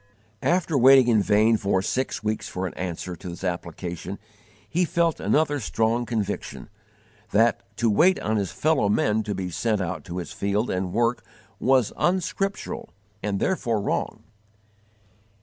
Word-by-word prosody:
After 175 -3 +1
waiting 130 0 +7
in 110 -3 +4
vain 110 +2 +4
for 100 -2 0
six 130 +1 -2
weeks 110 0 -2
for 90 +1 -3
an 90 - -4
answer 90 0 -5
to 90 - -8
this 85 +2 -8
application, 90 +1 -4 0.5
he 175 +2 +1
felt 170 -1 +1
another 145 -1 +1
strong 115 +1 0
conviction: 105 -3 -3 0.6
that 115 +2 +3 0.2
_to 115 - +1
wait 165 - +4
on 110 0 0
his 100 -3 -1
fellow 150 -9 +1
men 105 +1 +2
to 105 -1 -3
be 90 -1 -4
sent 110 +4 0
out 90 -1 -3
to 85 0 -6
his 90 - -5
field 100 +4 -1
and 90 -1 -2
work 120 +2 +1 0.4
was 130 -3 +3
unscriptural 195 +5 -1 0.3
and 100 -2 -1
therefore 120 - 0
wrong. 100 - -2
110 Hz, 150 wpm, -25 LUFS, 95-130 Hz, 0.6 s, waiting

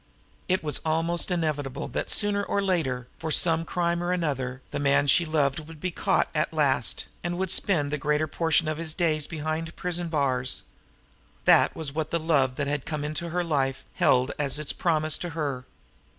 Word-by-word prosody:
It 185 -1 +2
was 150 -3 -1
almost 165 +2 0
inevitable 150 -6 -2
that - - -3
sooner 205 -1 +2
or 200 - -1
later, 160 -11 0
for 160 - -4
some 165 +1 +3
crime 170 0 -1
or 175 +1 -1
another, 135 -7 -2
the - - -2
man 140 0 +3
she 165 +4 +4
loved 145 -3 +1
would 160 -1 -11
be 185 +3 -2
caught - - +1
at - - 0
last, - - +1 0.2
and 175 0 -2
would 190 -1 0
spend 160 -7 +2
the 150 - -1
greater 150 +2 +1
portion 160 +1 +1
of 155 0 -2
his 165 -1 -4
days 155 -4 +1
behind 160 +1 -3
prison 175 -1 -1
bars. 130 -5 0 0.8
That - - +5
was 155 -4 -4
what 155 0 -2
the 170 - 0
love 140 -6 +2
that 145 - -1
had 145 -1 -1
come 150 -2 -3
into 155 +3 -2
her 175 +2 -1
life 135 -5 -1
held 125 +1 +3
as 145 -1 0
its 150 -1 -2
promise 155 -3 +1
to 175 - -4
her! 140 -5 -2
155 Hz, 190 wpm, -26 LUFS, 145-170 Hz, 0.8 s, That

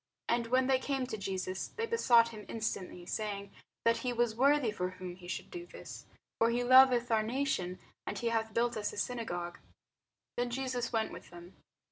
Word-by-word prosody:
And 235 0 +1
when 255 +2 +3
they 260 0 +3
came 270 -1 -1
to 250 -3 -4
Jesus, 190 -2 -3
they 455 - -3
besought 240 - +5
him 215 -2 -9
instantly, 190 -5 -4
saying 200 0 -3 0.3
that 230 0 +4
he 250 - -2
was 240 -2 +1
worthy 270 0 +3
for 180 -3 -2
whom 185 -1 -7
he 180 -1 -12
should - - -5
do 350 -1 -7
this: - - -10 0.3
for 230 - +5
he 240 +1 +1
loveth 250 -1 +7
our 220 -1 +4
nation, 220 -6 -1 0.3
and - - -3
he 235 - 0
hath 225 -1 0
built 235 +2 +1
us 210 -1 -2
a - - -9
synagogue. 175 -7 -3 0.8
Then 245 0 0
Jesus 250 -1 -2
went 225 -2 0
with - - -10
them. 175 +1 -12
230 Hz, 190 wpm, -33 LUFS, 200-250 Hz, 0.8 s, loveth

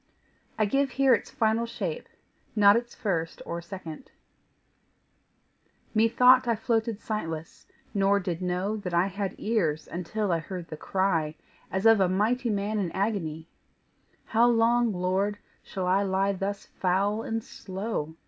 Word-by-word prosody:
I 215 - +3
give 275 +6 +1
here 265 +1 +4
its - - 0
final 225 +1 +1
shape, 190 -8 -4 0.5
not 205 -1 +7
its 240 +1 -2
first 170 -8 -2
or 170 0 -4
second: 170 - -9 1.8
Methought 250 +3 +5
I 235 - +3
floated 225 -1 -1
sightless, 165 -8 -5 0.3
nor 200 0 +3
did 180 -2 -3
know 180 +3 -1
That 180 -4 -4
I 170 +2 +4
had 195 0 -3
ears 165 -9 0
until 185 +4 -2
I 165 - +2
heard 175 0 -7
the - - -5
cry 165 -3 0 0.3
As 190 +3 -2
of 225 -2 +7
a 190 -2 +3
mighty 230 +6 +1
man 210 +1 -1
in 180 -4 -1
agony: 175 -6 -2 0.8
"How 230 +2 +3
long, 235 0 +3
Lord, 190 +2 0 0.2
shall 190 -2 -5
I 185 +2 +3
lie 195 0 +1
thus 195 +1 -4
foul 195 +4 0
and 225 0 -3
slow? 190 -5 -5
200 Hz, 145 wpm, -27 LUFS, 180-225 Hz, 1.8 s, not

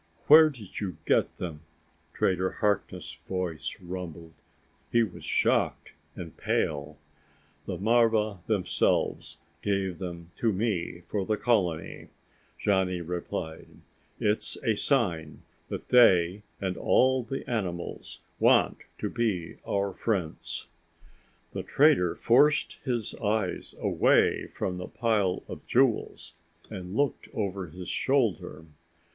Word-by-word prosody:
"Where 155 +1 +9
did 115 -10 -9
you 95 -6 -4
get - - +2
them?" 80 -4 -5 0.5
Trader 95 0 0
Harkness' 105 -1 -2
voice 90 -4 -3
rumbled. 85 -3 -7 0.6
He 120 0 +4
was 100 -6 -7
shocked - - +1 0.2
and 85 -3 -8
pale. 75 0 -1 0.7
"The 95 - -3
marva 110 -1 +2
themselves 100 -5 0 0.2
gave 95 -4 -1
them 85 -2 -7
to 115 - +2
me 95 -4 -2
for 100 +3 -3
the 105 +3 0
colony," 90 -9 0 0.5
Johnny 95 -3 +1
replied. 85 -1 -5 0.5
"It's 105 +1 +1
a 110 - +2
sign 90 - 0 0.3
that - - -6
they 95 -6 +5 0.2
and 95 -2 -2
all 130 0 +3
the 135 +3 -6
animals 90 -7 -4 0.2
want - - +4 0.2
to - - -2
be 105 -8 -2
our 100 -1 0
friends." 95 -9 -3 0.9
The - - -3
trader 135 - +3
forced 145 +5 +3
his 120 -6 -2
eyes 105 -3 -1
away - - +3
from 90 -1 -4
the 90 - -5
pile 105 -6 0
of - - -8
jewels 125 -2 +1 0.4
and 90 +1 -6
looked 140 -2 0
over 100 -3 -2
his 90 +3 -8
shoulder. 115 - 0
95 Hz, 115 wpm, -28 LUFS, 90-115 Hz, 0.9 s, Where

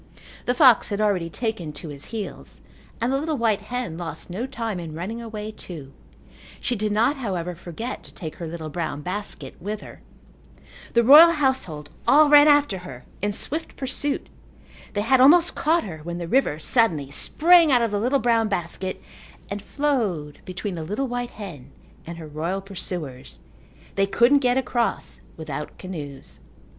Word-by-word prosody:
The 245 - +2
fox 255 -5 +6
had 205 -1 -2
already 195 -6 +1
taken 215 -7 -3
to 155 - -8
his 145 -1 -9
heels 220 -3 -7 0.4
and 240 +3 0
the 270 - +2
little 310 0 -2
white 220 -4 +1
hen 230 -6 -4
lost 175 +1 -5
no 225 +8 -3
time 225 -7 -4
in 160 -3 -7
running 205 +8 -5
away 215 -2 -6
too. 155 -10 -9 0.7
She 245 - -1
did 215 -1 -1
not, 235 +8 +2
however, 180 -8 -3
forget 180 +8 -6
to - - -12
take 160 -5 -7
her 170 - -5
little 160 -1 -6
brown 150 -3 -3
basket 180 -7 -5
with 210 +3 -4
her. - - -12 0.9
The 235 - +4
royal 310 +7 +9
household 260 - -1 0.2
all 300 +1 +6
ran 295 0 +8
after 290 -10 +4
her 130 -8 -10 0.2
in 205 +1 0
swift 310 +10 -4
pursuit. 280 +1 -1 0.7
They 205 - 0
had 255 +4 +4
almost 335 +6 +7
caught 330 +3 +2
her 160 -6 -7
when 170 +3 -6
the 170 -1 -5
river 250 - +2
suddenly 160 - +1
sprang 335 - +5
out 245 -2 +4
of 230 - 0
the 205 - 0
little 250 +6 +2
brown 230 -3 +2
basket 185 -1 -3 0.5
and 200 0 -3
flowed 205 - -1
between 185 +2 -4
the 165 -2 -5
little 210 +11 -2
white 245 0 -3
hen 150 -11 -8 0.4
and 170 0 -6
her 165 - -8
royal 160 +6 -3
pursuers. 175 -9 -5 0.5
They 195 0 +2
couldn't 240 +8 +4
get 250 -1 +2
across 240 -2 -1 0.2
without 150 -2 -6
canoes. 150 - -7
205 Hz, 170 wpm, -24 LUFS, 170-250 Hz, 0.9 s, royal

